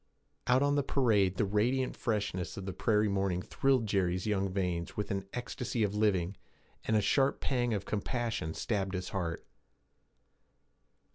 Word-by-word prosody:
Out 125 Hz, +2 st, +4 dB
on 145 Hz, 0 st, +3 dB
the 145 Hz, -, +3 dB
parade, 110 Hz, -9 st, +2 dB
the -, -, +2 dB
radiant 120 Hz, +6 st, +1 dB
freshness 100 Hz, -5 st, -2 dB
of 95 Hz, -, -5 dB
the 95 Hz, -, -4 dB
prairie 105 Hz, +2 st, +2 dB
morning 95 Hz, -2 st, 0 dB
thrilled 135 Hz, -4 st, +2 dB
Jerry's 95 Hz, -3 st, 0 dB
young 100 Hz, -2 st, +1 dB
veins 90 Hz, -3 st, -2 dB
with 105 Hz, +1 st, -2 dB
an 95 Hz, -1 st, -2 dB
ecstasy 120 Hz, -1 st, -2 dB
of 100 Hz, -1 st, 0 dB
living, 100 Hz, -3 st, +1 dB, 0.5 s
and 110 Hz, -, +1 dB
a -, -, +3 dB
sharp 135 Hz, +6 st, +2 dB
pang 120 Hz, -3 st, 0 dB
of 100 Hz, -, -3 dB
compassion 110 Hz, -6 st, -2 dB
stabbed 100 Hz, -3 st, -1 dB
his 90 Hz, 0 st, -3 dB
heart. 85 Hz, -4 st, -3 dB
105 Hz, 155 wpm, -32 LUFS, 95-120 Hz, 0.5 s, Out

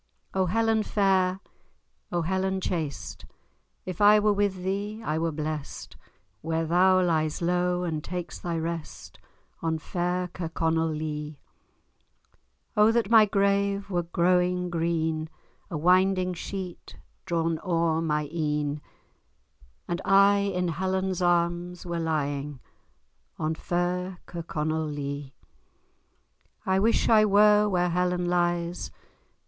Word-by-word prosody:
O 190 Hz, -1 st, +1 dB
Helen 225 Hz, +3 st, +2 dB
fair! 190 Hz, -3 st, +1 dB, 0.7 s
O 175 Hz, -1 st, 0 dB
Helen 190 Hz, +2 st, -1 dB
chaste! 160 Hz, -6 st, -4 dB, 0.6 s
If 185 Hz, +1 st, -5 dB
I 210 Hz, +1 st, +7 dB
were 210 Hz, 0 st, +3 dB
with 200 Hz, -2 st, -1 dB
thee, 200 Hz, +3 st, -3 dB
I 155 Hz, +1 st, -1 dB
were 165 Hz, 0 st, 0 dB
blest, 155 Hz, -1 st, -5 dB, 0.5 s
Where 165 Hz, 0 st, -1 dB
thou 185 Hz, +3 st, +4 dB
lies 155 Hz, -3 st, 0 dB
low, 180 Hz, +1 st, 0 dB
and 160 Hz, -3 st, -3 dB
takes 175 Hz, -2 st, -5 dB
thy 170 Hz, -1 st, -3 dB
rest, 165 Hz, 0 st, -6 dB, 0.4 s
On 160 Hz, -1 st, 0 dB
fair 180 Hz, +2 st, -2 dB
Kirkconnell 165 Hz, -1 st, -1 dB
Lee. 150 Hz, -1 st, -4 dB, 1.4 s
O 210 Hz, +1 st, +5 dB
that 230 Hz, -2 st, 0 dB
my 220 Hz, -2 st, +8 dB
grave 200 Hz, 0 st, +1 dB
were 175 Hz, -1 st, +1 dB
growing 180 Hz, +1 st, +1 dB
green, 160 Hz, -2 st, -1 dB, 0.4 s
A 170 Hz, -, -3 dB
winding 185 Hz, +2 st, +3 dB
sheet 185 Hz, 0 st, -7 dB, 0.3 s
drawn 165 Hz, -2 st, 0 dB
ower 165 Hz, -3 st, +1 dB
my 150 Hz, -2 st, -1 dB
een, 150 Hz, -2 st, -1 dB, 1.1 s
And 175 Hz, 0 st, -2 dB
I 200 Hz, +1 st, +5 dB
in 185 Hz, -3 st, -1 dB
Helen's 185 Hz, +2 st, -1 dB
arms 175 Hz, 0 st, 0 dB
were 170 Hz, -1 st, -3 dB
lying, 145 Hz, -3 st, -2 dB, 0.8 s
On 155 Hz, 0 st, -1 dB
fair 180 Hz, +2 st, -2 dB
Kirkconnell 160 Hz, -2 st, -3 dB
Lee! 140 Hz, -1 st, -5 dB, 1.3 s
I 190 Hz, 0 st, +2 dB
wish 225 Hz, +3 st, +2 dB
I 215 Hz, -2 st, +6 dB
were 210 Hz, 0 st, +5 dB
where 180 Hz, -2 st, +1 dB
Helen 180 Hz, 0 st, 0 dB
lies! 175 Hz, 0 st, 0 dB
175 Hz, 120 wpm, -27 LUFS, 160-190 Hz, 1.4 s, my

